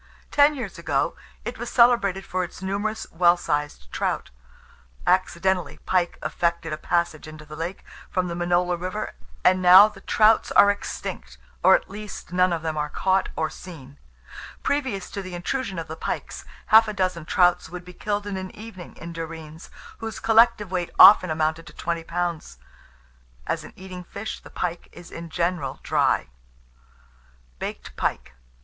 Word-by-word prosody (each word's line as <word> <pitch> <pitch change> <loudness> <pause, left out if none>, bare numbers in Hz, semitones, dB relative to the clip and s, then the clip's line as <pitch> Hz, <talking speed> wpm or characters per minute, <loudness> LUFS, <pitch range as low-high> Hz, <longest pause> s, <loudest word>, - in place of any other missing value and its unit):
Ten 290 +1 +5
years 235 -7 -6
ago - - 0 0.3
it - - -5
was - - -4
celebrated 235 -6 +3
for 185 0 -1
its 180 +1 -8
numerous 205 +3 -2
well 175 +1 +4
sized 145 - -3
trouts. - - -2 0.7
Accidentally 185 0 +1
pike 180 -2 +1
effected 170 -2 -1
a - - -3
passage 170 -2 -1
into 155 0 -11
the 150 0 -10
lake 170 +4 -5 0.2
from 185 -1 -1
the 170 - -4
Minola 175 +1 +1
river, 185 +4 -4 0.3
and 185 0 +4
now 185 +3 +9
the 210 -2 -12
trouts 220 0 +3
are 205 - +7
extinct, 205 - -6 0.2
or, - - +7
at - - -2
least, 210 -3 -9
none 180 0 +3
of 165 -2 -2
them 160 -1 -2
are 150 0 -1
caught 190 +4 +1
or 160 - 0
seen. 145 -6 -12 0.6
Previous 260 -10 -1
to 200 - -4
the 185 -2 -7
intrusion 195 +2 -3
of 165 -1 -4
the 160 - -6
pikes, - - -5 0.3
half 220 0 +8
a 215 - -3
dozen 185 -4 -1
trouts 180 0 +3
would 180 +1 -8
be 180 - -11
killed 205 +2 -3
in 200 -2 -4
an 185 0 -5
evening 210 -5 -10
in 170 +1 -8
Derreens, 160 -1 -8 0.3
whose 225 -1 -5
collective 225 -3 +4
weight 180 -2 -1
often 185 -2 +9
amounted 155 +1 -1
to - - -12
twenty 170 -1 -3
pounds." 170 - -3 0.9
As - - -2
an - - -11
eating 185 -1 -9
fish, 200 +5 -6
the - - -14
pike 175 -1 -4
is 175 0 -13
in 165 0 -8
general 170 -5 -2
dry. - - +1 1.3
BAKED - - -6
PIKE. 65 - -2
180 Hz, 165 wpm, -24 LUFS, 165-200 Hz, 1.3 s, now